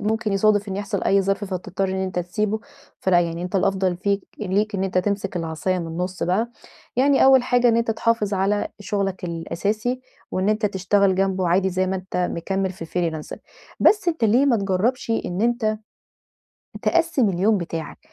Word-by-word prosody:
ممكن 215 0 -1
يصادف 205 0 +2
إنّه 195 +1 -3
يحصل 200 -1 -3
أي 195 0 +3
ظرف 195 +1 -1
فتضطر 190 0 -3
إن 190 - -2
أنت 190 -1 -2
تسيبه، 210 +5 -1 0.4
فلأ 180 -2 +4
يعني، 170 0 -2
أنت 180 +2 -2
الأفضل 190 -2 +1
فيك 200 +1 -1
ليك 210 +1 0
إن 190 0 0
أنت 185 -1 0
تمسك 195 -1 -1
العصاية 165 +3 -1
من 170 - -4
النُص 180 +3 -4
بقى، 210 +7 +1 0.5
يعني 270 +1 +4
أوّل 265 -1 +7
حاجة 245 -1 +3
إن 230 - +3
أنت 230 -1 +1
تحافظ 225 -2 0
على 195 +2 +1
شغلك 195 -2 -2
الأساسي، 205 +8 -2 0.3
وإن 185 +2 0
أنت 215 0 +2
تشتغل 195 0 +2
جنبه 190 -1 +1
عادي 190 +2 +2
زي 185 +1 0
ما 190 +1 -1
أنت 185 0 -6
مكمل 190 +2 -1
في 175 -3 -8
الFreelancing 165 -2 -3 0.4
بس 410 -4 +4
أنت 320 -9 0
ليه 245 +6 +4
ما 240 -4 +4
تجربش 205 +5 0
إن 195 -3 -1
أنت 230 -3 +1 1.0
تقسِّم 330 -9 +2
اليوم 195 +3 +2
بتاعك، 165 -3 -5
195 Hz, 175 wpm, -23 LUFS, 185-215 Hz, 1.0 s, أوّل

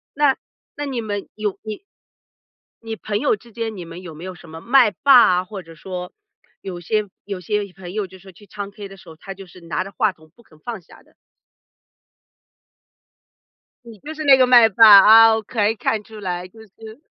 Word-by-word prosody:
那 285 -2 +2 0.4
那 290 - -4
你 260 -4 -4
们 205 -2 -5
有 210 -2 -3
你 215 - -8 1.0
你 225 -1 -6
朋 210 -1 -4
友 275 -4 +1
之 235 +3 -19
间 225 -1 -5
你 180 - -7
们 170 +2 -10
有 175 -4 -10
没 160 - -11
有 185 -1 -7
什 170 -2 -16
么 160 +1 -10
麦 245 -1 +4
霸 270 +4 +5 0.2
啊， 180 - -1
或 195 -2 -9
者 165 0 -15
说 180 +2 -8 0.5
有 180 -2 -7
些 205 +4 -2 0.2
有 195 -3 -6
些 200 +1 -3
朋 180 -1 -11
友 210 -1 -2
就 190 +1 -16
是 190 +1 -15
去 205 +4 -19
唱 200 0 -8
K 200 0 -10
的 195 - -13
时 175 -2 -16
候， 160 - -13
他 195 +5 -10
就 195 -1 -13
是 180 - -16
拿 170 +2 -3
着 195 - -11
话 - - 0
筒 155 0 -23
不 235 - -22
肯 155 -7 -23
放 225 +3 -7
下 - - -19
的？ - - -30 2.7
你 230 -2 -13
就 310 +2 -8
是 310 - -6
那 275 -2 +6
个 255 - +5
麦 240 -2 +7
霸， 220 +3 +6
啊， 225 +2 +7
我 220 - -3
可 215 -1 -1
以 225 - -2
看 215 0 -2
出 215 0 -13
来 180 -2 -5
就 220 +4 -17
是 220 +3 -14
205 Hz, 230 characters per minute, -20 LUFS, 180-225 Hz, 2.7 s, 麦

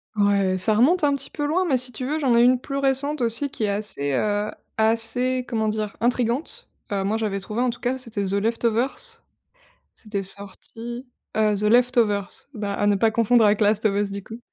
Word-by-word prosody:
Ouais, 200 -2 +2
ça 215 +3 +2
remonte 300 +10 +3
un 285 -1 +3
petit 275 - -7
peu 295 - -4
loin 360 +5 +1
mais, 265 - +2
si 250 0 -3
tu 250 +2 -5
veux, 300 +4 -1
j'en 260 -5 +2
ai - - +6
une 250 0 +4
plus 275 +2 -5
récente 275 +1 +1
aussi 235 +5 0
qui 260 - -5
est 210 - +1
assez, 200 -9 -2
heu, 205 +8 0 0.3
assez, 230 +3 +2
comment 220 -2 -1
dire, 215 -1 -3
intrigante. 250 - -1 0.2
Heu, 195 -1 0
moi, 210 +3 0
j'avais 210 -3 -2
trouvé, 210 +4 -4
en 250 -1 +1
tout 240 - -10
cas, 250 +1 -1
c'était 230 -5 -4
The 190 - -2
Left 225 +4 -1
Overse, 265 - -2 0.7
c'était 210 -3 -4
sorti, 225 +6 -7 0.3
heu, 215 -1 +2
the 205 - -2
Left 245 +4 +3
Overse, 205 +1 0
bah, 205 -2 -3
à 205 - 0
ne 205 - +4
pas 220 +3 +2
confondre 230 +1 +3
avec 210 +1 +3
Last 210 +1 +2
of 200 -1 +1
Us, 205 -1 -1
du 200 - -5
coup 225 +4 -10
225 Hz, 220 wpm, -23 LUFS, 205-255 Hz, 0.7 s, ai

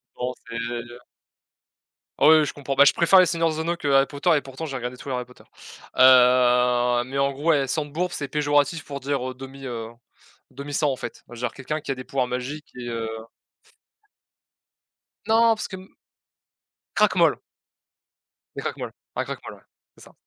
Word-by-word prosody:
Bon, 125 +1 -3 0.2
c'est 115 - -7
le 120 0 -3
le 120 +1 -12 1.2
Ah - - +4
oui, 160 - +9
oui, 155 - +6
oui, 150 - +1
je - - -4
comprends. 140 -1 -4
Bah, 140 +1 +7
je - - +6
préfère 170 +3 +5
Les 185 - +5
Seigneur 165 -1 +1
des 155 - -5
anneaux 170 +2 -1
que 150 - -4
Harry 135 0 +5
Potter 145 +5 -1
et - - +1
pourtant, 135 +4 -7
j'ai 135 -3 -5
regardé 125 0 -5
tout 140 - -11
les 130 - -2
Harry 125 0 -2
Potter. 125 0 -19 0.5
Heu, 125 -1 +5
mais 135 +2 -4
en 140 0 +2
gros, 145 +5 -4
ouais, 140 -4 +3
Sang-de-Bourbe, 155 +5 -2
c'est 145 -4 -4
péjoratif 145 +2 +1
pour 140 -1 -7
dire, 135 -1 -2
heu, 130 - -9
demi, 135 +1 -10
heu, 115 -3 -5 0.6
demi-sang, 145 +1 -2
en 130 - -2
fait. 120 - -8
Genre 120 0 -4
quelqu'un 150 +4 -4
qui 150 - -7
a - - +1
des 130 0 -9
pouvoirs 130 -1 -1
magiques 130 +5 -5
et 120 -1 -6
heu 115 -1 -3 2.2
Non 225 +1 +4
parce 215 - -5
que 190 - -7
m 185 +1 -14 1.1
Cracmol - - +3 1.2
les - - -5
Cracmols. - - -5 0.2
Un - - -1
Cracmol, - - -7
ouais, - - -18 0.4
c'est - - -15
ça. - - -18
135 Hz, 190 wpm, -24 LUFS, 125-150 Hz, 2.2 s, oui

